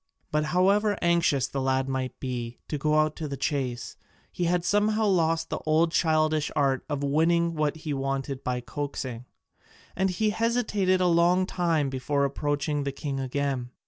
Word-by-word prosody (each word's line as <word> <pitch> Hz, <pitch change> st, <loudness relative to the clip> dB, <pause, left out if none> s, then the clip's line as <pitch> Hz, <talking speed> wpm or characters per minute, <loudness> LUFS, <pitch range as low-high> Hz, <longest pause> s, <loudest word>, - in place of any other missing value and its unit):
But 150 Hz, 0 st, +1 dB
however 200 Hz, +5 st, +2 dB
anxious 170 Hz, -6 st, +3 dB
the 135 Hz, -, -3 dB
lad 130 Hz, 0 st, +1 dB
might 130 Hz, -1 st, -3 dB
be 120 Hz, -2 st, -4 dB
to 150 Hz, -, -2 dB
go 150 Hz, +2 st, +1 dB
out 155 Hz, 0 st, +2 dB
to 155 Hz, -, -4 dB
the 140 Hz, -1 st, -5 dB
chase, 130 Hz, -5 st, -2 dB, 0.3 s
he 175 Hz, -, -2 dB
had 175 Hz, 0 st, +1 dB
somehow 215 Hz, +1 st, +2 dB
lost 165 Hz, -4 st, +1 dB
the -, -, -2 dB
old 160 Hz, +2 st, +2 dB
childish 155 Hz, -2 st, +2 dB
art 140 Hz, -3 st, +1 dB
of 145 Hz, -1 st, -2 dB
winning 165 Hz, +4 st, +2 dB
what 150 Hz, -2 st, 0 dB
he 155 Hz, -2 st, -4 dB
wanted 135 Hz, 0 st, -3 dB
by 125 Hz, -1 st, -2 dB
coaxing: 130 Hz, -3 st, -5 dB, 0.7 s
and 190 Hz, 0 st, +1 dB
he 210 Hz, +4 st, 0 dB
hesitated 210 Hz, -4 st, +1 dB
a -, -, +3 dB
long 175 Hz, +2 st, +4 dB
time 165 Hz, -7 st, 0 dB
before 140 Hz, +2 st, 0 dB
approaching 145 Hz, +1 st, -1 dB
the 140 Hz, -, -2 dB
king 140 Hz, 0 st, -4 dB
again. 135 Hz, -1 st, -2 dB
150 Hz, 170 wpm, -27 LUFS, 135-170 Hz, 0.7 s, long